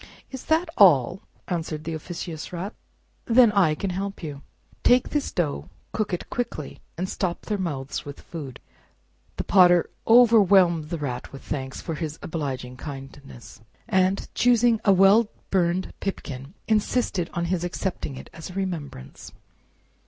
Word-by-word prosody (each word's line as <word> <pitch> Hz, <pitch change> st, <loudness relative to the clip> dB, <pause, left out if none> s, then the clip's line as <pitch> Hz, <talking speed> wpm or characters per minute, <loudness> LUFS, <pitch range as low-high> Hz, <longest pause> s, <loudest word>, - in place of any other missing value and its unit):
"Is 265 Hz, -2 st, -8 dB
that 320 Hz, +3 st, +2 dB
all?" 175 Hz, -, +6 dB, 0.3 s
answered 160 Hz, -3 st, -3 dB
the 165 Hz, -, -4 dB
officious 160 Hz, 0 st, -6 dB
Rat; 180 Hz, +4 st, -5 dB, 0.5 s
then 235 Hz, -1 st, +6 dB
I 185 Hz, -7 st, +3 dB
can 195 Hz, +3 st, -3 dB
help 195 Hz, +1 st, -4 dB
you. 145 Hz, -3 st, -6 dB, 0.4 s
Take 250 Hz, 0 st, +4 dB
this 295 Hz, -2 st, -1 dB
dough, 155 Hz, -5 st, -2 dB, 0.2 s
cook 215 Hz, -2 st, -2 dB
it 180 Hz, -, -3 dB
quickly, 235 Hz, -, -4 dB, 0.2 s
and 180 Hz, +2 st, -2 dB
stop 180 Hz, -2 st, -2 dB
their 210 Hz, -2 st, -2 dB
mouths 145 Hz, -7 st, -3 dB
with 145 Hz, -1 st, -9 dB
food." 140 Hz, -7 st, -8 dB, 0.8 s
The -, -, -2 dB
Potter 175 Hz, -3 st, +5 dB, 0.2 s
overwhelmed 200 Hz, -9 st, +6 dB
the 170 Hz, -, -2 dB
Rat 125 Hz, -5 st, -5 dB
with 135 Hz, -, -10 dB
thanks 135 Hz, -2 st, -5 dB
for 165 Hz, -, -4 dB
his 155 Hz, 0 st, -4 dB
obliging 130 Hz, -6 st, -4 dB
kindness, 135 Hz, -7 st, -10 dB, 0.3 s
and 190 Hz, +1 st, +1 dB
choosing 240 Hz, -2 st, +4 dB
out -, -, -27 dB
a -, -, +4 dB
nice 195 Hz, -, +6 dB
well 200 Hz, +4 st, +6 dB, 0.2 s
burned 180 Hz, 0 st, +1 dB
pipkin, 140 Hz, -5 st, -5 dB
insisted 210 Hz, -4 st, +1 dB
on 170 Hz, 0 st, 0 dB
his 175 Hz, -2 st, -1 dB
accepting 175 Hz, -5 st, -3 dB
it -, -, -10 dB
as 160 Hz, -, -8 dB
a -, -, -9 dB
remembrance. 165 Hz, -, -5 dB
175 Hz, 150 wpm, -25 LUFS, 150-200 Hz, 0.8 s, all